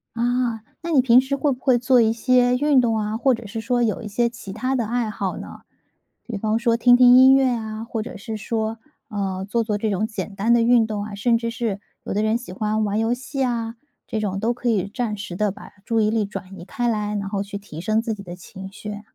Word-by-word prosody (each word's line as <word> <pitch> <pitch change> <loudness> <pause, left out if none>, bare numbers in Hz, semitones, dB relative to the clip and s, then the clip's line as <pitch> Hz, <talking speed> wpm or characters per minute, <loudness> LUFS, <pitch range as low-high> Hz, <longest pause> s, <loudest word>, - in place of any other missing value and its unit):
啊， 240 -1 0 0.2
那 335 0 -4
你 275 - +5
平 250 -1 +6
时 265 +2 -1
会 285 +1 +1
不 255 - -4
会 255 -2 +3
做 250 +1 +4
一 225 0 +3
些 250 +1 +3
运 285 0 +3
动 230 -2 +2
啊， 215 +1 -2
或 265 +1 +3
者 230 -1 -5
是 225 +3 -5
说 240 +2 0
有 215 -4 0
一 - - -6
些 235 +3 +1
其 215 -5 -9
它 255 +5 -2
的 240 -4 0
爱 235 0 -1
好 195 -3 -3
呢？ - - -9 0.6
比 230 -4 -5
方 215 +2 0
说 235 -1 +2
听 245 +1 +6
听 250 0 +7
音 260 +1 +8
乐 265 -1 +4
啊， 220 -2 -3
或 230 -1 -4
者 240 +3 -7
是 215 +2 -6
说， 220 +1 -2 0.3
呃， 195 -2 -3
做 235 +1 +1
做 210 -2 -1
这 215 +1 -1
种 210 +2 0
简 210 -2 -5
单 220 +4 +2
的 235 - +4
运 235 -1 +4
动 210 -2 -3
啊。 210 -1 -7
甚 230 +3 +2
至 230 0 -3
是 225 -4 -3 0.2
有 - - -3
的 210 +2 0
人 220 +2 +2
喜 235 -7 -9
欢 215 +1 0
玩 205 +1 -1
游 225 +2 +1
戏 265 +2 -3
啊， 230 -2 -2 0.3
这 220 - -2
种 195 -2 -2
都 230 +4 +1
可 245 0 -2
以 200 -4 +1
暂 215 -1 -3
时 190 -3 -6
地 210 +1 +1
把 - - -12
注 225 0 0
意 210 0 +3
力 220 -1 +1
转 195 -1 -7
移 - - -9
开 240 +4 -2
来， 210 -2 -1
然 200 -1 -3
后 200 0 -2
去 200 0 -6
提 170 -6 -9
升 215 +4 +1
自 225 -1 -2
己 200 -2 -9
的 175 -1 -9
情 190 +1 -10
绪。 210 0 -7
225 Hz, 275 characters per minute, -22 LUFS, 210-245 Hz, 0.6 s, 音